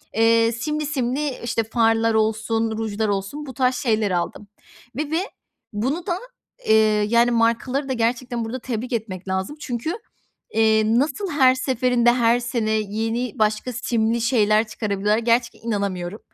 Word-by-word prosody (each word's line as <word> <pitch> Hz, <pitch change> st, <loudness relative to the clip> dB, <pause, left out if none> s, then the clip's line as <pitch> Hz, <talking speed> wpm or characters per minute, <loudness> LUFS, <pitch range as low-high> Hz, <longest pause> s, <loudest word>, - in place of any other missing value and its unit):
Eee, 230 Hz, +1 st, +4 dB
simli 300 Hz, +6 st, -3 dB
simli, 280 Hz, 0 st, -1 dB
işte, 230 Hz, -1 st, 0 dB
farlar 225 Hz, 0 st, +2 dB
olsun, 220 Hz, +1 st, 0 dB
rujlar 220 Hz, -1 st, -2 dB
olsun 205 Hz, +9 st, -3 dB
bu 265 Hz, -, -8 dB
tarz 255 Hz, +1 st, +1 dB
şeyler 220 Hz, -5 st, 0 dB
aldım 180 Hz, +3 st, -3 dB, 0.5 s
ve 300 Hz, 0 st, -3 dB
ve 325 Hz, -, +2 dB, 0.5 s
bunu 265 Hz, +12 st, -2 dB
da, 350 Hz, -2 st, 0 dB, 0.5 s
eee, 220 Hz, -, +6 dB, 0.3 s
yani, 235 Hz, +1 st, +4 dB
markaları 235 Hz, +4 st, +1 dB
da -, -, +1 dB
gerçekten 235 Hz, 0 st, -1 dB
burada 240 Hz, +4 st, -5 dB
tebrik 245 Hz, 0 st, -4 dB
etmek 195 Hz, -5 st, -4 dB
lazım. 190 Hz, +10 st, -3 dB
Çünkü, 255 Hz, +3 st, -3 dB, 0.6 s
eee, 220 Hz, 0 st, +4 dB
nasıl 285 Hz, -, 0 dB
her 260 Hz, -3 st, +5 dB
seferinde 250 Hz, -2 st, +2 dB
her 240 Hz, -1 st, +3 dB
sene 235 Hz, -3 st, -2 dB
yeni 220 Hz, +2 st, -2 dB
başka 215 Hz, +3 st, 0 dB
simli 230 Hz, -1 st, 0 dB
şeyler 220 Hz, -2 st, +3 dB
çıkarabiliyorlar, 210 Hz, -1 st, -1 dB
gerçekten 235 Hz, 0 st, 0 dB
inanamıyorum. 200 Hz, -2 st, -2 dB
230 Hz, 145 wpm, -22 LUFS, 220-255 Hz, 0.6 s, eee